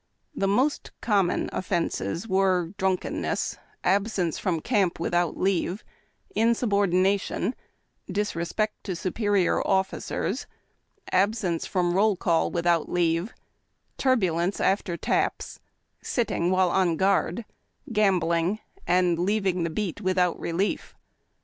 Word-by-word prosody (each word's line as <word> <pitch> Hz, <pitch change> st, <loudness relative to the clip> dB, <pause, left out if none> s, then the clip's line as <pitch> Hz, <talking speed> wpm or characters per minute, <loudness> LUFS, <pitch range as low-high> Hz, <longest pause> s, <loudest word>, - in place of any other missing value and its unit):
The 195 Hz, -9 st, 0 dB
most 255 Hz, +9 st, +1 dB
common 200 Hz, -5 st, +1 dB
offences 175 Hz, +1 st, -2 dB
were 185 Hz, -3 st, +1 dB
drunkenness, 190 Hz, -1 st, -1 dB, 0.2 s
absence 190 Hz, -3 st, +1 dB
from 180 Hz, -5 st, 0 dB
camp 195 Hz, -3 st, +1 dB
without 175 Hz, 0 st, 0 dB
leave, 190 Hz, +1 st, 0 dB, 0.5 s
insubordination, 200 Hz, -, +1 dB, 0.6 s
disrespect 205 Hz, +1 st, -2 dB
to 185 Hz, -, -3 dB
superior 195 Hz, +1 st, +1 dB
officers, 190 Hz, -1 st, -1 dB, 0.6 s
absence 185 Hz, -3 st, +1 dB
from 175 Hz, -2 st, 0 dB
roll 205 Hz, +2 st, +3 dB
call 170 Hz, -2 st, +1 dB
without 170 Hz, -2 st, +1 dB
leave, 170 Hz, +4 st, +1 dB, 0.7 s
turbu 220 Hz, -11 st, +2 dB
lence 175 Hz, +4 st, -1 dB
after 190 Hz, -3 st, +1 dB
taps, -, -, -1 dB, 0.4 s
sitting 225 Hz, -8 st, 0 dB
while 185 Hz, -1 st, +3 dB
on 175 Hz, -3 st, +2 dB
guard, 195 Hz, +2 st, +1 dB, 0.5 s
gambling, 180 Hz, -3 st, +2 dB, 0.3 s
and 175 Hz, -1 st, +3 dB
leaving 190 Hz, -1 st, +1 dB
the 170 Hz, -, 0 dB
beat 195 Hz, +2 st, -3 dB
without 185 Hz, -2 st, +1 dB
relief. 180 Hz, +5 st, -2 dB
185 Hz, 105 wpm, -26 LUFS, 175-205 Hz, 0.7 s, roll